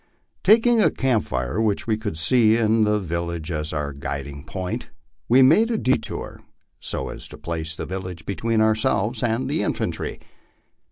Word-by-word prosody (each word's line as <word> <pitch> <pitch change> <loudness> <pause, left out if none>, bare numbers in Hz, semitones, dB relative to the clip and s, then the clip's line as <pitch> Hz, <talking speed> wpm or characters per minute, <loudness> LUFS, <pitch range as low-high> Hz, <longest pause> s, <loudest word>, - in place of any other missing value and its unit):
Taking 230 +1 +5
a - - +5
camp 125 -5 0
fire 65 - -2
which 105 -3 0
we 110 - +1
could 105 -6 -4
see 110 +7 +4
in 110 -1 +3
the 105 0 +2
village 85 -2 -4
as 75 -1 -1
our 75 -2 -3
guiding 70 +1 -6
point, 90 +1 -5 0.4
we 130 +3 +7
made 185 - +5
a 230 - 0
detour 130 -9 -2 0.4
so - - -3
as - - -8
to - - -11
place 80 -1 -4
the - - -5
village 90 -3 -6
between 110 +4 0
ourselves 110 +1 +1
and 120 +2 0
the 140 -5 0
infantry. - - -2
105 Hz, 165 wpm, -23 LUFS, 80-115 Hz, 0.4 s, we